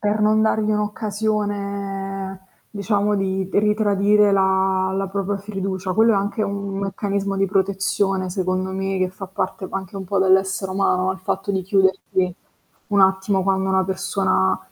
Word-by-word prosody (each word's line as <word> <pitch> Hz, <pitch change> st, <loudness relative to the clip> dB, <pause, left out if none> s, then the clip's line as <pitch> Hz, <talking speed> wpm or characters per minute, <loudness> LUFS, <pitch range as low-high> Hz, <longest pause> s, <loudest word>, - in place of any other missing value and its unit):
Per 210 Hz, +1 st, 0 dB
non 215 Hz, +1 st, +3 dB
dargli 220 Hz, -1 st, +1 dB
un'occasione, 200 Hz, -2 st, -3 dB, 0.3 s
diciamo, 205 Hz, 0 st, 0 dB
di 190 Hz, -1 st, -1 dB
ritradire 210 Hz, 0 st, +3 dB
la 190 Hz, -1 st, +2 dB
la 195 Hz, 0 st, -1 dB
propria 200 Hz, +1 st, -2 dB
fiducia. 195 Hz, -2 st, -4 dB
Quello 225 Hz, +3 st, +4 dB
è -, -, +2 dB
anche 205 Hz, +3 st, -1 dB
un 200 Hz, -1 st, -3 dB
meccanismo 200 Hz, 0 st, -2 dB
di 195 Hz, 0 st, +2 dB
protezione 195 Hz, 0 st, 0 dB
secondo 185 Hz, 0 st, -1 dB
me, 195 Hz, 0 st, -2 dB
che 185 Hz, 0 st, +1 dB
fa 195 Hz, +1 st, -8 dB
parte 190 Hz, +1 st, -4 dB
anche 195 Hz, 0 st, -5 dB
un 195 Hz, -, -5 dB
po' 195 Hz, +2 st, -1 dB
dell'essere 190 Hz, 0 st, +2 dB
umano, 185 Hz, -1 st, +1 dB
il 190 Hz, -, -10 dB
fatto 190 Hz, +1 st, -3 dB
di 190 Hz, -1 st, -1 dB
chiuderci 190 Hz, -1 st, +1 dB, 0.5 s
un 205 Hz, -1 st, +2 dB
attimo 190 Hz, 0 st, +3 dB
quando 190 Hz, 0 st, +1 dB
una 190 Hz, 0 st, +2 dB
persona 185 Hz, -, 0 dB
195 Hz, 150 wpm, -21 LUFS, 190-205 Hz, 0.5 s, Quello